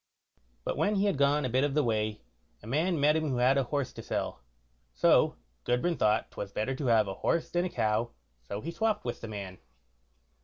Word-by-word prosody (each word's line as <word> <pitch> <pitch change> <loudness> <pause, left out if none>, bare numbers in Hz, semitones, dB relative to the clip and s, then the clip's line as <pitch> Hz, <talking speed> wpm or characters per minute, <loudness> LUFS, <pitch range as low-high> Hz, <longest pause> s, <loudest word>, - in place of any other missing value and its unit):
But - - -2
when 210 +1 +2
he 200 +1 +2
had 200 - +2
gone 140 +1 +2
a - - -1
bit 130 +3 +2
of 145 -1 0
the 150 - +3
way, 110 -2 -1 0.4
a - - -11
man 155 +8 0
met 150 +2 +4
him 155 -1 0
who 130 - -1
had 125 +2 +4
a 135 -2 +2
horse 140 0 -2
to - - -8
sell, - - -3 0.5
so - - +4 0.3
Gudbrand 140 +8 0
thought 105 0 +2
'twas 100 - -6
better 110 +6 -1
to 135 0 -3
have 110 -3 +4
a 95 - -3
horse 165 - -1
than 175 +1 +1
a - - -2
cow, 110 -3 0 0.3
so 100 - -6
he 165 - -4
swopped 215 - 0
with 120 - -4
the - - -6
man. 100 -4 -7
130 Hz, 220 wpm, -30 LUFS, 110-155 Hz, 0.5 s, met